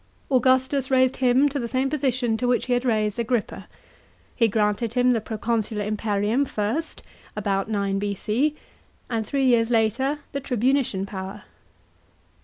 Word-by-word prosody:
Augustus 260 +1 +2
raised 260 -1 +3
him 260 +2 +4
to 285 0 -2
the 235 - -3
same 260 +3 0
position 255 -5 0
to 245 +2 -1
which 245 0 +1
he 250 - 0
had 245 0 +1
raised 215 -2 0
Agrippa. 235 -1 -2 0.7
He 230 - +3
granted 210 +2 0
him 250 0 +4
the 225 - 0
pro 220 0 -5
consular 220 -2 -1
imperium 210 +3 0
first 240 +5 -3 0.3
(about 200 0 -1
9 200 -2 0
B.C.), 210 +8 -1 0.6
and 225 -2 -1
three 275 +1 0
years 235 -2 +3
later 240 +5 +1
the 280 - -3
tribunician 250 -5 0
power. 195 +1 -7
235 Hz, 150 wpm, -24 LUFS, 210-260 Hz, 0.7 s, him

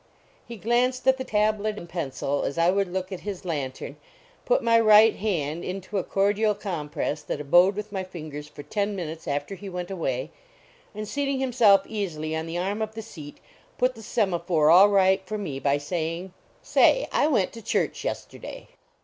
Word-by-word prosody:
He 235 - -8
glanced 245 +5 0
at 265 0 +5
the 260 - -4
tablet 215 -1 0
and 170 - -8
pencil 145 -4 -2
as 140 - -3
I 170 +1 +4
would 195 -1 0
look 185 +1 -3
at 190 - -5
his 200 -3 -6
lantern, 140 -3 -4 0.5
put - - +2
my 230 0 +5
right 215 0 +6
hand 170 -6 -2
into 195 +2 -4
a - - -2
cordial 205 +2 +1
compress 155 -6 -3
that - - -4
abode 175 +7 +4
with 210 0 -6
my 190 -2 -3
fingers 155 -5 -8
for 150 -1 -11
ten 200 +6 -2
minutes 165 -3 -6
after 145 +5 -2
he 195 +1 -8
went 180 0 -5
away, 135 -6 -3 0.6
and 215 0 -5
seating 280 +2 -1
him 260 -2 -2
self 205 -5 +5
easily 160 -7 -3
on 160 +1 -3
the 165 +1 -4
arm 195 +4 -2
of 220 0 -3
the 225 - -6
seat, 155 -9 -11 0.4
put 255 +1 +2
the 225 - -12
semaphore 175 -8 +1
all 190 +4 +8
right 190 -1 +4
for 215 - -3
me 150 -10 -4
by 140 +1 +1
saying: 165 +4 -4 0.2
" - - -34
Say, - - +4
I - - +3
went 230 -11 +1
to 230 - -9
church - - -1
yesterday." - - -6
190 Hz, 190 wpm, -25 LUFS, 160-215 Hz, 0.6 s, all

